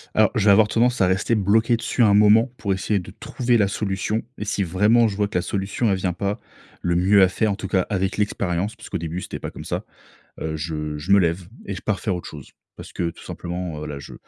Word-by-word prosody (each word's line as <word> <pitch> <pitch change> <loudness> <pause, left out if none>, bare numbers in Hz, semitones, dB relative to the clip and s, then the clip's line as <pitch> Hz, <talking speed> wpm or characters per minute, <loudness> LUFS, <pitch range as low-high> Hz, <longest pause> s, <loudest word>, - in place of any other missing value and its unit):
Alors, 110 -1 +4
je 105 - 0
vais 100 - +7
avoir 105 +1 +6
tendance 120 +2 +1
à 95 - +5
rester 95 +5 +1
bloqué 110 +4 +3
dessus 115 +2 -2
un 105 -3 +5
moment 105 +4 +5
pour 100 -3 -1
essayer 100 +2 0
de 90 - -9
trouver 120 -1 0
la 100 - +3
solution, 100 +2 -2 0.2
et 105 - -3
si 100 -1 -1
vraiment 105 +7 +3
je 105 - -3
vois 105 0 +1
que 100 - -2
la - - +1
solution, 100 +4 -2
elle 95 - +1
vient 95 -1 -1
pas. 100 +4 -3 0.4
Le 85 -1 0
mieux 95 +3 +5
à 95 - +7
faire 105 +3 0
en - - -1
tout 100 -1 -6
cas 95 0 +2
avec 95 -1 0
l'expérience 100 -1 -1
parce - - -12
qu'au - - -2
début, 85 +2 -4
c'était - - -6
pas - - -6
comme - - -10
ça. - - -3 0.6
Heu, 80 0 -3
je 75 -1 -4
je 75 +6 -4
me 100 - +7
lève 85 0 0 0.2
et 100 - -4
je 90 - -7
pars 110 -3 -1
faire 100 -5 -1
autre 90 - -7
chose. 75 -3 -11 0.2
Parce - - -10
que 85 - -1
tout - - -15
simplement, 85 -3 -5
heu, 75 - -5
là, 75 - -5
je 70 - -10
100 Hz, 260 wpm, -22 LUFS, 90-105 Hz, 0.6 s, vais